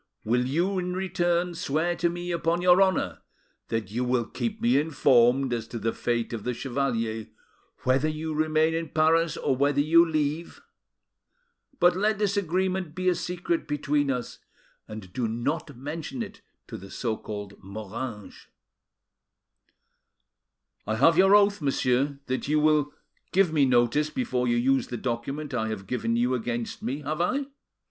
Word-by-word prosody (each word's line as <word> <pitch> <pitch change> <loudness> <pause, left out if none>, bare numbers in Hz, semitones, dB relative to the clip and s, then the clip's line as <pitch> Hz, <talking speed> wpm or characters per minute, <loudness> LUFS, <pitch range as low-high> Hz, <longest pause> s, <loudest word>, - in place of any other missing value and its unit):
Will 125 +3 +1
you, 175 +8 0
in 180 0 -3
return, 175 -1 0
swear 165 +1 -1
to 170 +1 +1
me 175 +1 -4
upon 170 +1 0
your 180 +1 +6
honour 190 -1 +1 0.5
that 110 -4 -3
you 120 +3 -1
will 125 -1 +1
keep 220 - -4
me 235 -7 +3
informed 130 -4 +3
as 115 -1 -3
to 120 - -6
the 115 0 -1
fate 120 -1 -2
of 110 -3 -4
the 125 -1 -2
chevalier, 115 -5 -2 0.6
whether 130 +4 +2
you 155 +1 -4
remain 155 +1 +2
in 165 -1 -2
Paris 160 +1 +2
or 135 - 0
whether 140 +2 +2
you 165 +3 +6
leave? 155 0 -2 1.2
But 175 0 +5
let 210 +3 +1
this 205 -1 0
agreement 185 -2 -1
be 185 0 +1
a - - +3
secret 175 -1 -2
between 145 -1 0
us, 125 -3 -3 0.5
and 105 -4 -9
do 125 -2 -1
not 140 +5 -3
mention 160 - -5
it 205 -1 -11 0.2
to 110 - -8
the 95 -1 -11
so 115 +1 -2
called 105 -2 -8
Moranges." 105 +3 -7 2.4
"I 110 - 0
have 155 +8 +5
your 195 +3 +6
oath, 200 -2 +4
monsieur, 135 0 +1
that 130 +1 -3
you 150 +1 +2
will 150 -1 +3 0.4
give 185 -4 +3
me 145 -3 +4
notice 125 +5 +2
before 130 - -1
you 120 0 +2
use 130 +1 +2
the 120 - -5
document 130 +5 -4
I 110 -3 -1
have 110 -3 -5
given 115 +2 -1
you 120 +2 +1
against 120 -1 -3
me, 140 +4 -3
have 155 +3 -3
I? 270 +10 0
145 Hz, 160 wpm, -26 LUFS, 120-170 Hz, 2.4 s, your